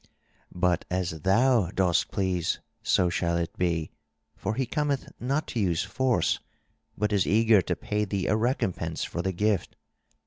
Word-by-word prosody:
But 90 Hz, -1 st, +1 dB
as 90 Hz, -3 st, -2 dB
thou 115 Hz, -, +3 dB
dost 90 Hz, -3 st, +1 dB
please, 90 Hz, -3 st, -1 dB, 0.2 s
so 90 Hz, -, +3 dB
shall 85 Hz, 0 st, 0 dB
it 85 Hz, -1 st, -3 dB
be, 85 Hz, -3 st, -1 dB, 0.4 s
for 105 Hz, +2 st, -3 dB
he 130 Hz, -, 0 dB
cometh 145 Hz, +1 st, -1 dB
not 140 Hz, +5 st, -1 dB
to 120 Hz, -, -2 dB
use 90 Hz, -5 st, +1 dB
force, 115 Hz, -1 st, +1 dB, 0.6 s
but 105 Hz, +1 st, 0 dB
is 100 Hz, -3 st, +2 dB
eager 110 Hz, -1 st, +5 dB
to -, -, -2 dB
pay 105 Hz, 0 st, -2 dB
thee 95 Hz, -2 st, -2 dB
a -, -, +2 dB
recompense 95 Hz, -, -1 dB
for 85 Hz, -, -3 dB
the 95 Hz, +2 st, -1 dB
gift. 105 Hz, 0 st, 0 dB
95 Hz, 160 wpm, -27 LUFS, 90-110 Hz, 0.6 s, eager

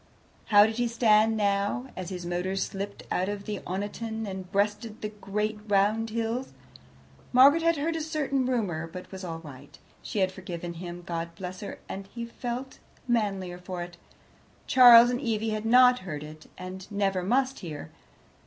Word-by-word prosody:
How 205 Hz, -1 st, +7 dB
did 220 Hz, +1 st, -2 dB
he 240 Hz, 0 st, +1 dB
stand 225 Hz, -1 st, +3 dB
now, 205 Hz, +5 st, 0 dB
as 185 Hz, -1 st, -5 dB
his 180 Hz, -2 st, -6 dB
motor 180 Hz, +2 st, -2 dB
slipped 200 Hz, +1 st, -4 dB
out 185 Hz, +2 st, 0 dB
of 205 Hz, -1 st, -4 dB
Oniton 210 Hz, +3 st, -4 dB
and 190 Hz, -1 st, -7 dB
breasted 210 Hz, +2 st, -1 dB
the 210 Hz, -, -2 dB
great 210 Hz, +1 st, -3 dB
round 210 Hz, +3 st, +2 dB
hills? 230 Hz, +3 st, -2 dB, 0.8 s
Margaret 275 Hz, +6 st, +7 dB
had 335 Hz, -1 st, +2 dB
heard 325 Hz, +3 st, -1 dB
a 325 Hz, -, -2 dB
certain 290 Hz, -4 st, -1 dB
rumour, 190 Hz, -11 st, -1 dB
but 180 Hz, +2 st, -10 dB
was 190 Hz, 0 st, -8 dB
all 165 Hz, -2 st, -4 dB
right. 140 Hz, -3 st, -12 dB, 0.2 s
She -, -, -6 dB
had 190 Hz, -2 st, +2 dB
forgiven 175 Hz, -2 st, -6 dB
him, 175 Hz, +1 st, -8 dB
God 170 Hz, 0 st, -4 dB
bless 185 Hz, +1 st, -7 dB
her, 205 Hz, -, -7 dB
and 195 Hz, 0 st, -6 dB
he 235 Hz, +3 st, -6 dB
felt 245 Hz, +2 st, -6 dB, 0.3 s
the 245 Hz, -, 0 dB
manlier 195 Hz, -5 st, -1 dB
for 180 Hz, -1 st, -5 dB
it. 175 Hz, 0 st, -11 dB, 0.7 s
Charles 245 Hz, -2 st, +9 dB
and 245 Hz, +1 st, -2 dB
Evie 225 Hz, -3 st, -1 dB
had 215 Hz, 0 st, -3 dB
not 250 Hz, +1 st, +6 dB
heard 155 Hz, -6 st, -6 dB
it, 155 Hz, +1 st, -11 dB
and 185 Hz, +1 st, -8 dB
never 195 Hz, -2 st, 0 dB
must 260 Hz, +7 st, +1 dB
hear. 155 Hz, -, -7 dB
205 Hz, 170 wpm, -28 LUFS, 185-235 Hz, 0.8 s, Charles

